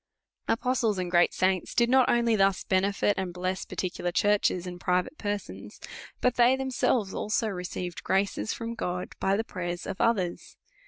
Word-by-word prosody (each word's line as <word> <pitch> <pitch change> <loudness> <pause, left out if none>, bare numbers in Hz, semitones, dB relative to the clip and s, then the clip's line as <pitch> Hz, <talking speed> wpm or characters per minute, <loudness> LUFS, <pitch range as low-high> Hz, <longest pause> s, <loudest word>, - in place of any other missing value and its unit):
Apostles 235 -3 +1
and 180 -1 -3
great 175 -1 +4
saints 185 -1 0
did 235 - +4
not 260 +1 +4
only 235 -1 +3
thus 195 -2 +2
benefit 200 +2 +1
and 185 -2 -3
bless 185 +1 -3
particular 180 -1 -3
churches, 200 -2 +2
and 180 -1 -7
private 180 - 0
persons; 205 -1 -5 0.4
but 250 -1 +1
they 245 +2 +5
themselves 255 -6 0
also 220 +1 -1
received 180 -1 -5
graces 200 +3 0
from 230 0 -4
God 180 -5 -3
by 195 +1 +1
the 220 - 0
prayers 175 -5 -5
of 195 - -4
others. 190 -7 0
195 Hz, 160 wpm, -28 LUFS, 180-230 Hz, 0.4 s, they